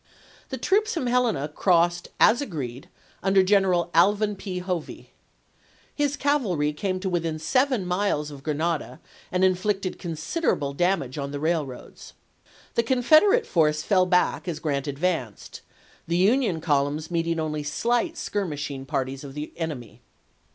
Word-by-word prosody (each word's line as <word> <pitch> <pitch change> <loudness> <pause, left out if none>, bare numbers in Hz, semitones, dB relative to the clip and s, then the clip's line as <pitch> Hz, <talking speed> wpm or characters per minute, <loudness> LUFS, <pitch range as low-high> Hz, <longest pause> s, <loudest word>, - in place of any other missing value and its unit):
The - - -4
troops 430 +2 +1
from 320 - -1
Helena 240 - +1
crossed, 175 +2 +2
as 235 +5 +5
agreed, 140 - -6 0.3
nnder 190 0 +4
General 185 -3 +2
Alvin 205 +4 +3
P. 190 -1 -6
Hovey. 180 -3 -5 0.8
His 290 -1 0
cavalry 195 - +1
came 185 +4 -2
to 195 - -2
within 165 -3 -1
seven 255 - +1
miles 180 -5 -1
of 140 -2 -10
Grenada, 155 +2 -2 0.3
and 180 0 +1
inflicted 190 +1 0
considerable 165 - -2
damage 155 -5 0
on 140 0 -3
the 145 0 -5
railroads. 155 -5 -3 0.6
The - - +3
Con 245 +2 0
federate 405 - +5
force 150 -3 +2
fell 185 -3 +3
back 180 0 +1
as 170 -3 -2
Grant 145 -2 -2
advanced; 145 - -3 0.5
the 170 +1 0
Union 200 -3 +2
columns 150 +1 0
meeting 165 -1 0
only 155 -1 -2
slight 240 - -1
skirmishing 145 -8 -4
parties 130 +1 -3
of 140 -1 -9
the 150 +1 -6
enemy. 150 -9 -6
175 Hz, 140 wpm, -25 LUFS, 150-205 Hz, 0.8 s, as